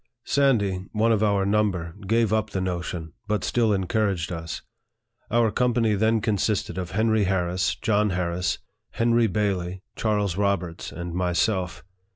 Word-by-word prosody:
Sandy, 100 -10 +2
one 110 +1 +3
of 110 -2 +2
our 100 -2 +2
number, 100 -5 0
gave 115 0 +2
up 110 -1 +1
the 95 - -2
notion, 85 -3 -3
but 105 -2 0
still 115 -3 +2
encouraged 95 -3 0
us. 85 -1 -5 0.7
Our 115 -2 +3
company 120 -2 +2
then 110 +2 +2
consisted 105 -2 0
of 90 -2 -4
Henry 110 0 +2
Harris, 90 0 0
John 105 -1 +1
Harris, 90 -1 -1 0.4
Henry 115 0 +3
Bailey, 95 -2 -1
Charles 105 -4 0
Roberts, 95 -4 -1
and 85 0 -6
myself. 90 0 0
100 Hz, 140 wpm, -25 LUFS, 90-110 Hz, 0.7 s, one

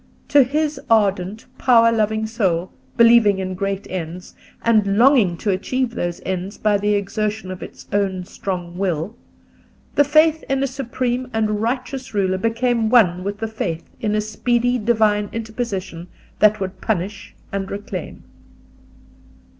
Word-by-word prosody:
To 290 - +6
his 300 +4 0
ardent, 200 -2 +1
power 230 -3 +5
loving 220 -1 0
soul, 190 -6 -1 0.3
believing 230 -4 +6
in 185 -1 -3
great 195 +1 -3
ends, 180 0 -6 0.3
and 210 -3 +3
longing 230 -8 +5
to 205 - -1
achieve 240 +6 -1
those 175 -4 -3
ends 190 +2 -3
by 210 -1 +2
the 205 +1 +1
exertion 205 0 -2
of 185 - -7
its - - -10
own 195 -2 0
strong 180 -2 -5
will, 185 +2 -1 0.8
the 290 - +5
faith 310 +2 +3
in 270 0 +1
a - - +3
supreme 255 -1 -2
and 215 -1 0
righteous 250 0 -3
Ruler 190 -2 +1
became 230 +1 +1
one 185 -7 +4
with 200 +1 -3
the 225 +1 -3
faith 175 -7 -4 0.2
in 210 -1 0
a 215 - +2
speedy 240 +3 0
divine 210 -2 +2
interposition 210 -6 -4 0.3
that 215 0 +5
would 190 -1 -5
punish 200 -1 -3 0.2
and 195 -1 -3
reclaim. 205 +1 -6
210 Hz, 145 wpm, -21 LUFS, 190-235 Hz, 0.8 s, To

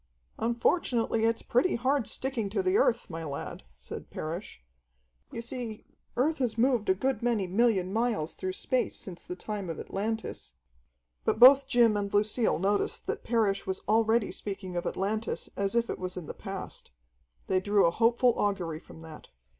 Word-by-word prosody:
"Unfortunately, 235 -1 +1
it's 230 0 +1
pretty 250 +10 +2
hard 260 +1 +1
sticking 255 -6 -2
to 220 - -1
the 370 +1 +2
Earth, 245 - +2
my 165 -2 -6
lad," 140 -3 -5 0.2
said - - -9
Parrish. 170 +6 -6 0.7
"You 230 - -5
see, 235 -3 -6 0.3
Earth 300 +5 +1
has 235 -4 -1
moved 240 -3 +2
a 190 - +5
good 260 +7 -1
many 235 -5 +1
million 195 -1 +2
miles 220 -8 0
through 185 0 -4
space 255 +6 -1
since 180 -3 -6
the 180 - -6
time 200 -1 -5
of 165 - -4
Atlantis." 210 - -4 0.7
But - - 0
both 265 +2 +9
Jim 240 -5 +4
and 200 -1 -2
Lucille 215 +3 +2
noticed 200 +4 0
that - - -3
Parrish 215 -5 +1
was 190 0 -2
already 220 +1 +3
speaking 195 -3 -6
of 175 - -2
Atlantis 215 +4 -2
as 200 +2 -1
if 235 0 +2
it - - -4
was 185 0 -4
in 180 - -5
the - - -6
past. - - -7 0.6
They 185 - +2
drew 205 +1 +3
a 170 - +4
hopeful 235 +4 +3
augury 180 -6 -1
from 160 - -14
that. 160 -1 -11
215 Hz, 170 wpm, -29 LUFS, 190-240 Hz, 0.7 s, both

